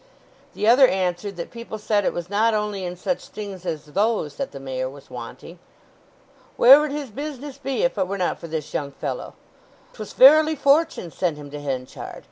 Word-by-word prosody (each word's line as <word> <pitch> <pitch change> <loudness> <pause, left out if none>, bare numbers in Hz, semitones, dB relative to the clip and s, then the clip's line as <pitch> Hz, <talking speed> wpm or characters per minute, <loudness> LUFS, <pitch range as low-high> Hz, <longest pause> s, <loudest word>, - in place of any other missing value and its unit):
The 210 - -1
other 255 +3 +7
answered 185 0 -2
that 170 - -7
people 235 -2 -7
said 210 -1 0
it - - +2
was 175 -1 -5
not 215 +3 +2
only 210 -2 -2
in 180 0 -4
such 265 +9 -3
things 195 -4 -8
as 155 -2 -3
those 200 0 -1
that 275 - -3
the 140 - -9
Mayor 130 -1 -3
was 140 +1 -14
wanting. - - -9 1.0
"Where 265 +4 +9
would 300 -1 -1
his 285 -4 -5
business 285 +2 -7
be 275 - -2
if - - 0
it - - +1
were 200 +1 -3
not 180 - -1
for 170 - -8
this 155 -2 -5
young 140 -1 -3
fellow? - - -5 0.6
'Twas 215 -2 -8
verily 310 +4 +7
Fortune 280 - +2
sent 170 -3 -1
him 145 -1 -10
to 145 0 -7
Henchard. 130 -3 -5
205 Hz, 195 wpm, -23 LUFS, 165-265 Hz, 1.0 s, Where